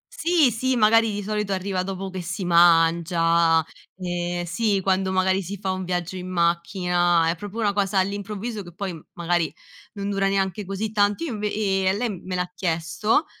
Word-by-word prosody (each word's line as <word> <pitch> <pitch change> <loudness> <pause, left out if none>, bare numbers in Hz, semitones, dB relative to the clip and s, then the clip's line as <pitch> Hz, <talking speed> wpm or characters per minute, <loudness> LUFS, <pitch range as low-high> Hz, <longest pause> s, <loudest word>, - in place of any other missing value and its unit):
Sì, 330 -5 +3
sì, 255 +4 0
magari 225 0 +4
di 205 0 -4
solito 210 -1 -2
arriva 190 0 -2
dopo 190 0 -4
che 185 - -5
si 180 +2 -4
mangia. 165 -1 +4 0.3
Ehm, 175 -1 -3
sì, 200 +3 0
quando 190 0 +1
magari 190 +1 +2
si 195 +3 -6
fa 190 -1 -2
un 185 0 -3
viaggio 180 0 -3
in 185 0 -6
macchina, 175 0 +1
è 170 - 0
proprio 205 +5 -7
una 205 -2 +1
cosa 195 -1 0
all'improvviso, 205 +3 -2
che 175 -2 -12
poi 190 -4 -4 0.2
magari 170 -3 0 0.4
non 200 -1 -4
dura 195 0 +1
neanche 195 0 -1
così 195 +3 -3
tanto. 205 +6 +1
Io 295 - -3
inv 210 -1 -6
ehm, 195 -2 0
a - - -3
lem 210 -6 -3
me 185 - -3
l'ha 180 0 -2
chiesto, 175 - 0
190 Hz, 185 wpm, -24 LUFS, 175-205 Hz, 0.4 s, magari